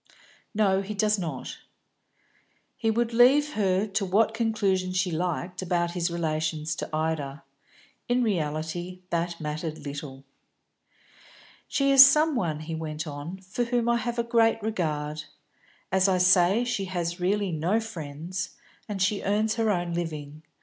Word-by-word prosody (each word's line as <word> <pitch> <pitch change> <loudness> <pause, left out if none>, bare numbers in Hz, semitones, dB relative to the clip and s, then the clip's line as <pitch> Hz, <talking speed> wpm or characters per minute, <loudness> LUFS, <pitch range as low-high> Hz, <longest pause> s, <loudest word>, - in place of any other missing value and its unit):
"No, 195 -3 +3
he 205 +2 -6
does 210 0 +2
not." 170 -3 -5 1.2
He 225 - -1
would 230 +1 0
leave 275 +5 +5
her 195 -1 +1
to 205 0 -2
what 210 +4 +2
conclusion 205 -5 0
she 185 0 0
liked 175 +2 -2
about 175 -1 0
his 175 0 -1
relations 160 -2 -2
to - - -4
Ida; 155 -3 -2 0.7
in 245 +1 +2
reality 175 -1 -2
that 170 0 -1
mattered 155 0 -5
little. 140 -1 -7 1.4
"She 275 0 +1
is 270 -1 +11
some 300 +3 +4
one," 160 -9 -1
he 160 +1 -6
went 155 -1 -4
on, 150 +5 -7
"for 190 +6 -3
whom 235 -1 0
I 235 0 +3
have 235 +1 -3
a 235 - +1
great 230 -1 +3
regard. 155 -7 -2 0.7
As 190 +1 +3
I 185 - +3
say, 185 +4 +4
she 220 -5 -1
has 175 -1 -3
really 195 +1 0
no 170 +7 +1
friends, 180 -3 -6 0.3
and 205 -2 -3
she 200 0 +1
earns 215 +2 +1
her 225 -1 0
own 175 -3 0
living. 155 -3 -5
185 Hz, 150 wpm, -27 LUFS, 160-215 Hz, 1.4 s, is